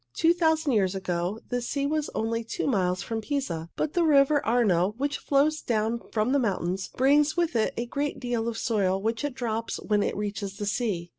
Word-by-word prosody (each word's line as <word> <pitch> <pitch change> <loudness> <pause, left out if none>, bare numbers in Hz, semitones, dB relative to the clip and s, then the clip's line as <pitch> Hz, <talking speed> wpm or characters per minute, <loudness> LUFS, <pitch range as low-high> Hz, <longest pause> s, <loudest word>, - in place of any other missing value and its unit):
Two 330 +1 +4
thousand 320 -3 +2
years 195 -5 +2
ago 185 +2 -2
the 245 0 -1
sea 280 +3 -2
was 300 +1 -1
only 230 +1 -1
two 225 - -4
miles 185 -7 +1
from 225 -1 -3
Pisa, 200 - -3
but 305 - -2
the 350 - +2
river 290 -2 +4
Arno, 210 -5 +2
which 285 +2 -1
flows 295 +2 +2
down 230 0 0
from 220 +2 +1
the 280 - +3
mountains, 190 -5 -1
brings 295 +4 +3
with 340 -6 +1
it 220 - +2
a 235 - -1
great 285 +4 -3
deal 240 -2 -2
of 230 -1 -3
soil 195 -5 +1
which 225 +4 -2
it 290 -3 -2
drops 230 -2 -3
when 210 -1 +1
it - - -1
reaches 200 -1 -4
the 205 - -3
sea. 200 -5 -1
230 Hz, 205 wpm, -27 LUFS, 205-280 Hz, -, Two